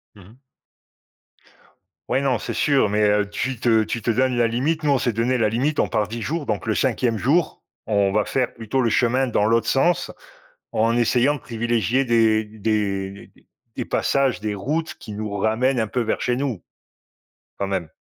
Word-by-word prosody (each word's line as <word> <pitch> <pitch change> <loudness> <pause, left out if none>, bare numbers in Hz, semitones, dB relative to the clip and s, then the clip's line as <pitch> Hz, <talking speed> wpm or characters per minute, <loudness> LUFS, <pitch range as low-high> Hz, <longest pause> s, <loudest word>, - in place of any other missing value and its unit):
Mmh 100 - -15
mh. 110 - -18 1.7
Ouais, 135 - +1
non, 130 -4 +1
c'est - - -5
sûr 140 -7 +2
mais 105 +1 0
heu, 105 0 +2
tu 120 +4 -3
te 115 -2 +3
tu 115 +2 -4
te 115 - +1
donnes 125 +1 +1
la 120 - +3
limite. 145 +8 -1
Nous, 150 - +2
on 135 - +3
s'est 120 - 0
donné 120 +3 0
la 110 -2 +2
limite. 140 +7 0
On - - +2
part 105 -1 0
10 115 +2 -6
jours 150 +5 -3
donc - - -3
le 110 - +1
5e 120 -3 0
jour, 150 - 0 0.2
on 100 -2 +2
va 105 0 +1
faire 130 -3 -1
plutôt 115 +3 -2
le 115 -3 +1
chemin 125 +2 +2
dans 105 -3 +1
l'autre 115 +1 +2
sens 165 +8 +1 0.6
en 115 +2 +2
essayant 125 +4 +2
de - - -8
privilégier 120 +2 0
des 115 -3 +3
des 100 -2 -3 0.5
des - - -2
passages, 135 -5 0
des 105 -1 -2
routes 150 +11 -3
qui 105 - -9
nous 105 0 -5
ramènent 120 +5 +1
un 110 - 0
peu 125 +4 -1
vers 110 - -1
chez 125 - 0
nous, 130 -8 -3 1.0
quand 100 - -2
même. 95 -5 -2
115 Hz, 195 wpm, -22 LUFS, 110-130 Hz, 1.7 s, te